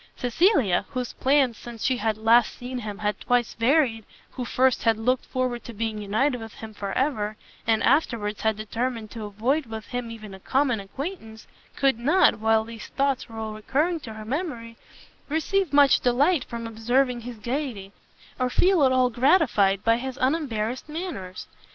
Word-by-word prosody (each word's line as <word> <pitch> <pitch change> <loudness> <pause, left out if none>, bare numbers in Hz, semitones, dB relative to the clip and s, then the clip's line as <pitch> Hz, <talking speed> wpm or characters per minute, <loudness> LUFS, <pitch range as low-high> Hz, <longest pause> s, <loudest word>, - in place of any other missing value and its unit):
Cecilia, 250 - +2
whose 250 -2 -4
plans 265 -4 +2
since 235 -2 -8
she 255 -1 +2
had 220 -1 -1
last 225 +1 +4
seen 250 +1 -5
him 210 -3 -6
had 210 0 -2
twice 245 -2 +1
varied, 235 -2 +2 0.3
who 250 - -5
first 255 +1 +2
had 225 -2 +2
looked 250 +3 0
forward 255 -2 -2
to 235 - -8
being 220 0 -2
united 240 +5 0
with 225 -1 -9
him 220 -1 -9
for 200 -1 -5
ever, 215 -7 -1 0.3
and 225 -1 +2
afterwards 235 -7 +1
had 220 -1 +1
determined 225 +1 -3
to 225 -2 -6
avoid 235 +8 -1
with 220 -1 -7
him 245 -1 -4
even 215 -3 -9
a 190 - -10
common 260 +1 +1
acquaintance, 225 - -7 0.3
could 270 -4 +2
not, 310 +3 +4
while 220 0 +3
these 225 -1 -9
thoughts 275 -2 -1
were 225 - -10
all 220 -1 -4
recurring 295 +11 0
to 230 -7 -9
her 215 0 -8
memory, 240 -4 -4 0.5
receive 325 +3 0
much 285 -2 +6
delight 270 +5 +2
from 235 -1 -6
observing 240 +3 0
his 240 0 -8
gaiety, 235 -4 -4 0.5
or 255 0 +1
feel 360 +4 +3
at 260 - +5
all 255 -1 +3
gratified 235 - +3
by 230 0 +3
his 260 +1 -5
unembarrassed 255 -4 -1
manners. 300 - -6
240 Hz, 175 wpm, -25 LUFS, 220-270 Hz, 0.5 s, much